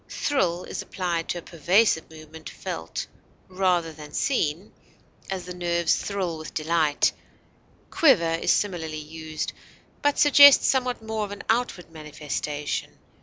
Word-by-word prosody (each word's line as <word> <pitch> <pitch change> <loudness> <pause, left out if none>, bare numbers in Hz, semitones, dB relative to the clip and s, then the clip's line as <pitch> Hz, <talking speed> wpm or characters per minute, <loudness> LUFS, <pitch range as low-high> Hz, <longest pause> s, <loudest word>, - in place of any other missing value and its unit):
Thrill 180 - 0
is - - -5
applied 175 -3 -3
to - - -1
a - - -6
pervasive 175 +2 +2
movement 160 0 -11
felt 80 0 -5 0.4
rather 180 -3 0
than 150 -1 -11
seen; 180 - -1 0.6
as, 190 -2 -4
the 180 - -7
nerves 170 -1 +1
thrill 185 -5 -3
with 155 - -9
delight; 155 -1 +1 0.8
quiver 170 - +4
is 165 - +1
similarly 165 -6 -1
used, 155 0 -6 0.5
but 290 -1 +1
suggests 285 -1 +8
somewhat 250 -3 0
more 220 -1 -2
of 205 - -7
outward 225 -7 -1
manifestation. 150 -1 -5
170 Hz, 125 wpm, -25 LUFS, 155-205 Hz, 0.8 s, suggests